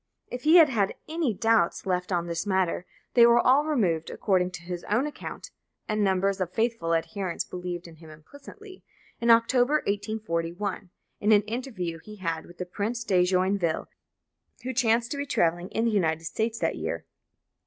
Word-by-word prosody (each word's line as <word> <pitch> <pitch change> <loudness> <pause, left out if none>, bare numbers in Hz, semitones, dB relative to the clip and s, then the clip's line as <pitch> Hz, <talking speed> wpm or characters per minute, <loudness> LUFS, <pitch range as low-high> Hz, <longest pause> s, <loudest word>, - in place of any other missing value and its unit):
If 250 - -5
he 315 +3 +6
had 330 -3 +9
had 205 -6 0
any 315 -4 0
doubts 225 -4 +1
left 180 0 -1
on 175 -2 0
this 170 +3 -3
matter, 190 -2 0 0.3
they 240 - +7
were 235 0 +5
all 270 +5 +4
removed, 185 - 0
according 185 -3 +1
to 170 - -8
his 175 0 -6
own 230 +7 +1
account 300 - -7 0.4
(and 215 -1 0
numbers 195 0 +1
of 180 - -1
his 185 - -29
faithful 225 -8 0
adherents 185 +1 -3
believed 180 -1 -6
in 165 -1 -14
him 160 0 -14
implicitly), 285 - -13 0.4
in 235 - 0
October 245 +4 +4
1841, 200 -2 -3 0.3
in 210 - +2
an 210 -1 +6
interview 215 -7 -4
he 210 +6 -11
had 165 -5 -4
with 175 - -15
the 180 - -4
Prince 215 +6 -3
de 185 -5 +3
Joinville, 185 -2 0 0.7
who 260 +1 -3
chanced 235 -1 +2
to 285 - -2
be 285 - -2
travelling 175 -3 +1
in 225 - -1
the 230 - +2
United 165 -6 +1
States 220 +6 -2
that - - -1
year. - - -4
200 Hz, 180 wpm, -27 LUFS, 175-235 Hz, 0.7 s, had